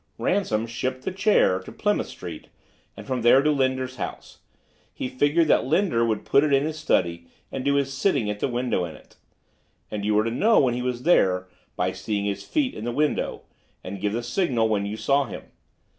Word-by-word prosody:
"Ransom 115 - 0
shipped 130 +3 -4
the - - -2
chair 190 - +3
to 95 - -11
Plymouth - - 0
Street - - -9 0.5
and - - -9
from 130 -2 -2
there 120 +4 +6
to 150 - +3
Linder's 130 -2 0
house. - - -7 0.5
He - - -4
figured 145 +5 +2
out - - +5
that - - -6
Linder 160 -6 +2
would 110 -2 -1
put 140 - +4
it 150 - +1
in 135 0 +4
his 155 +1 -3
study 85 - 0 0.2
and 130 - -4
do 140 +1 +2
his 140 -1 0
sitting 135 - +1
at 105 0 -3
the - - 0
window 120 -6 -1
in 80 -3 -6
it. - - -19 0.7
And 105 -1 -4
you 105 +1 +1
were 105 - +4
to 115 - -2
know 220 - +4
when 130 -3 +3
he 125 - -2
was 125 -1 -3
there 90 - +3 0.3
by - - 0
seeing 100 -2 -3
his 100 -1 -3
feet 285 -4 0
in - - -7
the 120 - -2
window, 150 +4 -1 0.4
and 95 +1 -7
give 105 0 0
the 120 +1 -2
signal 120 -3 +1
when 100 -2 0
you 105 +2 -4
saw 140 +4 +2
him. 110 - -8
125 Hz, 215 wpm, -24 LUFS, 105-140 Hz, 0.7 s, there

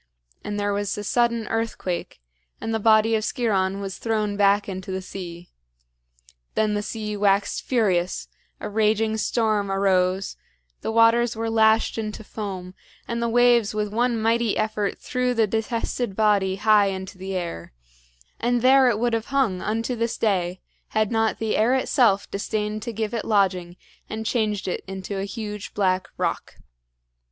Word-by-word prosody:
and 205 0 -3
there 205 0 0
was 205 0 -2
a 205 - -4
sudden 235 0 +1
earthquake, 225 - -3 0.4
and 225 - -3
the 225 - 0
body 220 +1 +4
of 220 -1 +1
Sciron 200 -6 0
was 195 -1 -5
thrown 215 -3 -1
back 200 0 +3
into 190 -1 -5
the 190 - -2
sea. 175 -2 -8 1.0
Then 215 -1 +2
the 205 - 0
sea 210 0 -4
waxed 200 0 +1
furious, 190 -8 0 0.3
a - - -5
raging 220 +1 +1
storm 215 -2 0
arose, 190 -1 +1 0.4
the - - -2
waters 230 +1 +4
were 225 0 -2
lashed 220 0 +3
into 215 0 -5
foam, 190 -4 -6 0.3
and 235 0 -2
the 235 - 0
waves 240 -3 +4
with 210 -1 -2
one 240 0 +1
mighty 230 0 +1
effort 215 -2 -1
threw 250 -1 -1
the 225 -1 +4
detested 225 0 -2
body 200 -3 +2
high 210 0 +4
into 190 0 -5
the 190 0 -4
air; 170 - -4 0.7
and 240 0 +1
there 260 0 +6
it 220 - +1
would 240 +1 0
have 225 0 -1
hung 255 -10 +1
unto 225 +3 -1
this 230 0 -2
day 185 -4 0 0.3
had 215 0 0
not 225 -1 +1
the 220 -1 -1
air 235 +4 +3
itself 235 -6 +2
disdained 210 +1 -2
to 235 - -4
give 220 0 -3
it 230 - -2
lodging 185 -4 +1 0.3
and 220 0 -4
changed 215 -4 0
it 180 - -3
into 195 +1 -5
a 195 - -2
huge 210 0 -6
black 185 -3 +1
rock. - - -2
215 Hz, 165 wpm, -24 LUFS, 195-225 Hz, 1.0 s, there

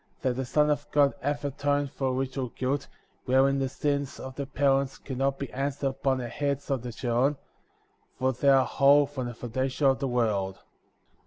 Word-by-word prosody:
That 130 -1 +2
the 130 +1 -2
Son 150 +4 +2
of 145 0 -2
God 145 -1 +4
hath 145 +1 -2
atoned 145 0 0
for 135 -2 -1
original 130 0 -2
guilt,*' 130 +4 -2 0.4
wherein 135 +1 +3
the 135 -1 0
sins 140 0 -2
of 130 - -7
the 140 -1 -4
parents 135 0 +1
can 130 -2 -7
not 135 0 +1
be 140 - -6
answered 140 +1 -1
upon 135 0 0
the 125 -2 -4
heads 140 +2 -2
of 135 -3 0
the 125 0 -6
children, 125 +4 0 0.8
for 130 +1 +1
they 140 +3 +2
are 135 -1 +6
whole 140 +1 +5
from 135 -3 -5
the 120 - -6
foundation 130 +4 -2
of 135 -1 +4
the 135 - -1
world. 105 -6 0
135 Hz, 190 wpm, -28 LUFS, 130-140 Hz, 0.8 s, are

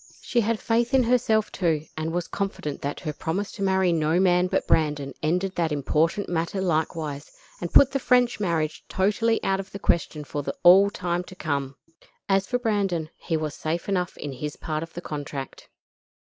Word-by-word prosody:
She 240 - +1
had 225 0 0
faith 235 +2 +1
in 260 - +5
herself, 230 -3 +2
too, 160 -5 0
and 160 +1 -3
was 175 0 -2
confident 195 -7 -4
that 145 +1 -4
her 155 -4 -3
promise 185 +7 -3
to 200 - -9
marry 190 -2 +2
no 160 +1 +2
man 180 -1 +4
but - - 0
Brandon 145 -3 +1
ended 180 +5 0
that 165 -3 0
important 155 +7 +1
matter 170 +3 -1
likewise, 155 -4 -1 0.3
and 175 - -4
put 275 -1 +7
the 275 - 0
French 245 -2 +3
marriage 160 -5 -1
totally 210 +4 +1
out 195 0 +1
of 195 0 -7
the - - -6
question 165 -5 0
for 145 0 -4 0.2
all 190 +3 +8
time 175 -3 -2
to 185 - -12
come. 140 -5 -2 0.5
As 195 0 +2
for 245 - +1
Brandon, 195 -9 -1
he 165 - -2
was 155 -2 -3
safe 160 +4 -3
enough 180 -3 -1
in 145 - -5
his 150 +3 -5
part 155 -2 -3
of 165 0 -8
the 175 - -6
contract. 145 -4 -6
175 Hz, 185 wpm, -25 LUFS, 155-200 Hz, 0.5 s, all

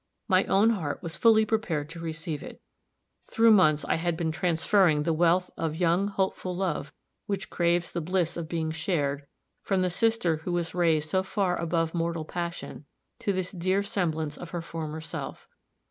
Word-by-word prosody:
My 190 -2 +4
own 210 +4 +4
heart 165 -7 -3
was 165 -1 -4
fully 220 -1 +5
prepared 195 -10 -1
to 165 0 -8
receive 160 -2 -4
it. - - -10 0.7
Through 225 0 +5
months 155 -8 +5
I - - +1
had 170 0 -1
been 160 -1 -1
transferring 170 -1 +2
the 165 +1 +1
wealth 175 +3 +2
of 160 -2 -2
young, 175 +3 +2
hopeful 190 -2 -2
love, 170 -6 -2 0.4
which 195 -2 -3
craves 170 0 +1
the 170 - -2
bliss 175 0 0
of 165 -2 -5
being 160 -2 -1
shared, 145 -4 -1 0.3
from 190 -2 +1
the 180 - 0
sister 225 -5 +1
who 170 +3 -4
was 170 -1 -1
raised 165 -4 +2
so 190 - +3
far 190 -1 0
above 165 -1 -1
mortal 165 -2 -1
passion, 170 -3 -5 0.3
to 200 - 0
this 185 -2 -2
dear 185 +2 0
semblance 160 -7 -2
of 175 - -8
her 175 0 -4
former 160 -1 -5
self. 160 - -7
170 Hz, 175 wpm, -27 LUFS, 160-190 Hz, 0.7 s, fully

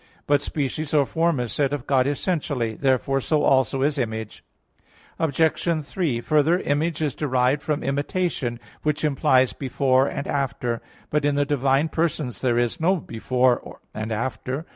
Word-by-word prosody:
But 145 -1 +3
species 150 +1 -2
or 145 -2 +4
form 165 0 +1
is 120 -3 -2
said 140 -1 +1
of 145 -4 -3
God 135 -2 +2
essentially. 145 -6 -1
Therefore 135 +2 +1
so 150 +3 +1
also 135 0 +3
is 145 0 +1
Image. 110 -3 -4 0.8
Obj. 160 0 +1
3: 140 -9 -1
Further, 155 +5 +3
Image 155 -1 -1
is 145 -4 0
derived 130 -1 +1
from 150 -1 -2
imitation, 140 -3 -1 0.2
which 150 0 -1
implies 130 -3 +3
"before" 130 0 +1
and 140 - -4
"after." 125 -4 -2 0.3
But 150 -1 +1
in 145 0 +2
the 145 0 +2
divine 140 +1 +2
persons 155 -7 -2
there 120 -2 +1
is 120 -1 0
no 180 +4 +3
"before" 125 -3 0
and 110 +1 -4
"after." 130 +6 -3
140 Hz, 155 wpm, -24 LUFS, 130-150 Hz, 0.8 s, or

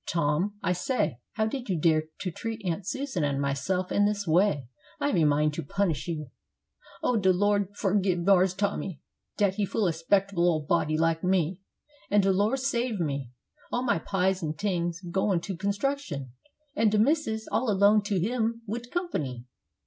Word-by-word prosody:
Tom, 165 +5 0
I 180 - +2
say, 180 - -1
how 220 0 +1
did 245 +1 -4
you 180 -4 0
dare 155 0 +3 0.2
to 180 - -2
treat 225 +3 -5
Aunt 180 +2 -2
Susan 265 - -2
and 140 -1 0
myself 140 +7 -1
in 205 0 +3
this 205 -1 -2
way? 165 - +2 0.3
I 285 - +1
have - - 0
a 165 - +3
mind 150 +1 +2
to - - -4
punish 190 0 -1
you." 155 -6 -4 0.7
"Oh, 245 - +2
de 190 -3 +4
Lor' 205 +1 +2
forgib 185 -3 +1
Marse 190 -1 +4
Tommy 195 -5 -2 0.4
dat 200 -3 +3
he 205 - +1
fool 205 +1 0
a - - +2
'spectable 175 +2 +1
ole 155 -3 0
body 155 -2 +1
like 165 +1 +1
me; 180 -1 +1 0.5
an' 205 +1 +4
de 195 0 +3
Lor' 205 +7 +2
save 245 -5 -1
me! 140 -6 -2 0.4
all 245 - 0
my 235 -9 +1
pies 190 +1 0
an' 155 -2 -2
tings 175 -2 -1
goin' 190 +1 0
to 190 +2 -4
construction, 200 - -2 0.4
an' 225 -4 +3
de 210 - +1
missus 220 -2 +1
all 245 0 +1
alone 205 +1 +5
to 205 -2 -1
hum 230 -1 -1
wid 235 +3 -5
comp'ny! 145 - -3
190 Hz, 180 wpm, -27 LUFS, 165-210 Hz, 0.7 s, alone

